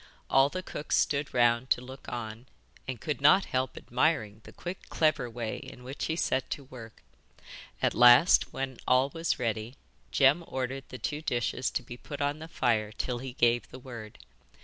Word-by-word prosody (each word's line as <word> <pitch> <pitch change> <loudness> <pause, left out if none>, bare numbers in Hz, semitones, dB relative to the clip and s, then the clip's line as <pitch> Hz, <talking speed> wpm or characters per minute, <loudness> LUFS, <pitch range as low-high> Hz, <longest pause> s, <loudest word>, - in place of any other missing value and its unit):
All 135 +1 +5
the 185 +4 -5
cooks 150 - -2
stood 145 -1 +1
round 120 +1 +3
to - - +3
look 130 +2 -10
on, 115 +1 -6 0.4
and 130 -3 -4
could 150 +2 -3
not 150 +7 +6
help 130 0 -2
admiring 115 -5 0
the - - -11
quick, 180 +2 -8
clever 155 -6 +1
way 115 -1 -4
in 125 - -11
which 130 +3 -5
he 160 - -1
set 135 -5 0
to 140 - -4
work. 120 -4 -12 0.8
At - - +3
last, 125 +8 +7
when 135 -2 -4
all 130 +2 +4
was 165 0 -1
ready, 115 0 -2 0.4
Jem 140 +5 +4
ordered 135 +1 -3
the 130 - -7
two 150 +4 -3
dishes 125 -3 -1
to - - -3
be 120 +1 -9
put 145 +3 -8
on 145 +1 -1
the 160 - -8
fire 115 -8 0
till 120 +3 -3
he 130 0 -6
gave 120 -4 +2
the - - -10
word. 120 -5 -9
130 Hz, 185 wpm, -29 LUFS, 120-145 Hz, 0.8 s, last